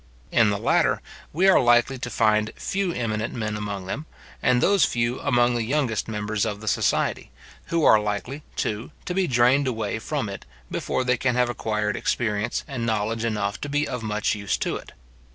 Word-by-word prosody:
In 115 -3 +4
the 100 - 0
latter, - - +2 0.3
we 180 +5 +2
are 190 - +7
likely 120 +2 +3
to 120 - -4
find 110 -2 +2
few 195 -2 -1
eminent 110 -6 -2
men 110 -3 -2
among 100 -2 -4
them, 145 +12 -5 0.3
and 125 -1 +3
those 195 +7 +4
few 120 +1 0
among 120 -3 +2
the 120 - 0
youngest 120 -2 0
members 105 -1 -2
of 105 -2 -2
the 110 - -10
society, - - +1 0.4
who 165 -1 0
are 110 - +7
likely, 105 +7 -3
too, 110 +4 -2 0.2
to 180 - -2
be 190 0 +1
drained 130 +2 +3
away 110 -4 -2
from - - -2
it, - - -7 0.3
before 130 - -1
they 125 0 +2
can 125 0 0
have 125 -1 +2
acquired 105 -2 -1
experience 110 -1 -1
and 135 -5 -4
knowledge 110 0 -1
enough 105 -2 -1
to 145 - -4
be 145 +1 0
of 125 - -4
much 105 -1 0
use 100 -2 -1
to - - -2
it. - - -9
115 Hz, 190 wpm, -24 LUFS, 105-130 Hz, 0.4 s, are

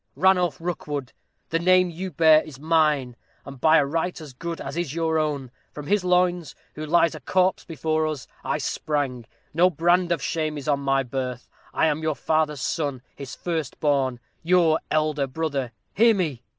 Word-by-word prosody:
Ranulph 180 -6 +3
Rookwood, 150 -6 -4 0.4
the 165 - +1
name 185 +1 +4
you 185 +3 -5
bear 160 -1 +5
is 150 -5 -11
mine, 150 -5 +1 0.3
and 135 -2 -10
by 160 +1 +6
a 145 - +3
right 165 +5 -2
as 150 -4 -10
good 170 +5 -5
as 135 +2 -6
is 170 -4 -3
your 160 -1 +1
own. 145 -5 -2 0.2
From 150 - -8
his 200 +4 +1
loins, 180 -2 +1 0.2
who 155 - -7
lies 170 +1 +3
a 155 - -7
corpse 185 +6 +1
before 155 -1 -1
us, 150 -5 -4 0.2
I - - -1
sprang. 135 -6 -2 0.3
No 175 +4 +5
brand 175 +1 +2
of 170 - +1
shame 155 +1 -2
is 140 - -7
on 145 -2 +2
my 135 -1 +1
birth. 125 -1 -4 0.2
I - - +1
am 155 0 0
your 155 -1 -1
father's 155 -3 0
son 140 -4 -2
his 140 -3 -8
first 160 -6 -4
born 135 -4 +1 0.2
your 165 -2 +3
elder 155 -2 +1
brother. 140 -3 -3 0.2
Hear 230 +1 +5
me!" 155 -11 -2
155 Hz, 180 wpm, -24 LUFS, 140-170 Hz, 0.4 s, by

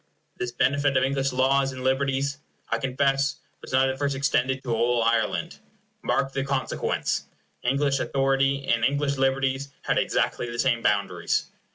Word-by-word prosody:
This 125 0 -3
benefit 140 +2 +2
of 130 - +3
English 135 0 0
laws 135 +1 +2
and 130 0 -7
liberties, 135 +2 0 0.3
I 115 - 0
confess, 135 +2 +1 0.3
was - - -10
not 130 +1 +4
at 130 0 -3
first 140 -1 0
extended 135 -1 0
to 120 - -1
all 120 +1 +2
Ireland. 115 -2 0 0.4
Mark 135 0 0
the 135 - -1
consequence. 140 -1 -1 0.3
English 135 +2 +1
authority 135 0 +1
and 115 -1 +2
English 140 +2 +1
liberties 135 +1 0
had - - +1
exactly 120 - 0
the 120 - -6
same 120 -1 +2
boundaries. 100 -2 0
135 Hz, 155 wpm, -25 LUFS, 125-140 Hz, 0.4 s, not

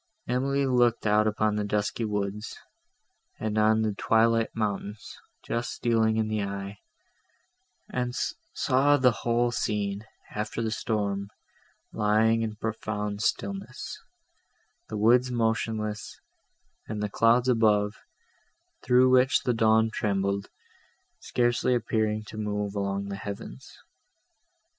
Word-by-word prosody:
Emily 135 +3 +1
looked 120 -3 +2
out 105 0 +3
upon 105 0 +1
the 105 - 0
dusky 105 +2 -1
woods, 105 0 -3 0.8
and 110 -1 -2
on 110 +1 +3
the 110 -1 0
twilight 115 +2 +2
mountains, 105 -1 -3 0.3
just 120 +1 -2
stealing 110 -2 +1
in 110 -1 +1
the 110 -1 -1
eye, 100 0 -5 1.1
and 125 -1 -2 0.4
saw 140 +2 +3
the 130 -2 +4
whole 120 +3 0
scene, 105 -2 -2 0.2
after 105 +2 -4
the 110 - -1
storm, 100 -3 -2 0.6
lying 110 +1 +3
in 110 -1 -3
profound 105 -2 -3
stillness, 195 - -3 0.9
the 110 - -4
woods 120 +4 +4
motionless, 110 -2 -2 0.7
and 105 -1 -4
the - - +1
clouds 115 +4 +3
above, 105 -4 +3 0.9
through 125 +1 +4
which 130 +1 +4
the 125 - +1
dawn 110 0 +3
trembled, 100 -1 -1 0.7
scarcely 120 +1 +1
appearing 110 -2 0
to 110 - -10
move 105 -1 -2
along 100 0 -2
the 100 - -4
heavens. 100 -11 -8
110 Hz, 115 wpm, -27 LUFS, 105-120 Hz, 1.1 s, the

